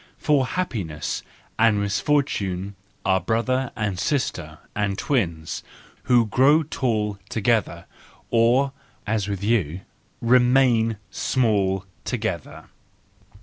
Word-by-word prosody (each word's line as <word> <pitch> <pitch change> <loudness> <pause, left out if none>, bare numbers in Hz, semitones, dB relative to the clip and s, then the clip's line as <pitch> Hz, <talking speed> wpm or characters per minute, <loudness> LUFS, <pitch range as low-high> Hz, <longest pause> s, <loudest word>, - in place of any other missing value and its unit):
—for 140 -4 +2
happiness 100 - -3 0.4
and 110 -2 +4
misfortune 100 -3 0 0.3
are 95 0 +3
brother 120 +6 0
and 105 -5 -2
sister, 90 - -2 0.2
and 100 -2 -1
twins, 85 - -1 0.4
who 120 -2 +4
grow 140 +9 +4
tall 110 -8 -1
together, 110 -1 0 0.5
or, 120 +4 +3 0.3
as 105 -2 -1
with 100 -1 -4
you, 95 -6 0 0.4
remain 120 -2 +4
small 100 -7 +1 0.2
together! - - -4
110 Hz, 95 wpm, -23 LUFS, 100-125 Hz, 0.5 s, and